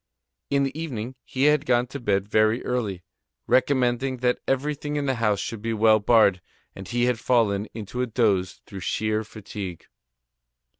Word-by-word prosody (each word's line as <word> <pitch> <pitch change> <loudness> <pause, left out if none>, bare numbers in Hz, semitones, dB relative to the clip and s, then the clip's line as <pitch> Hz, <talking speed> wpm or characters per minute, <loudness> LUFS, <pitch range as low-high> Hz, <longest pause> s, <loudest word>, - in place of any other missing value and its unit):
In 140 0 +2
the 135 0 -2
evening, 130 -7 -4
he 135 -1 -2
had 150 0 +4
gone 120 -1 +3
to 140 - -6
bed 100 -4 0
very 110 +2 +2
early, 105 -8 -2 0.4
recommending 130 -1 +2
that 125 0 +1
everything 145 +2 -1
in 145 -1 -1
the 135 - +1
house 105 -3 +2
should 115 -1 -5
be 115 0 -2
well 110 0 +5
barred, 105 -4 +4 0.3
and 95 -1 -9
he 120 0 +1
had 125 -2 +1
fallen 110 -5 +1
into 115 +3 -5
a 125 - 0
doze 100 -6 0
through 100 - -8
sheer 110 +3 -1
fatigue. 105 -5 -8
115 Hz, 165 wpm, -25 LUFS, 105-130 Hz, 0.4 s, well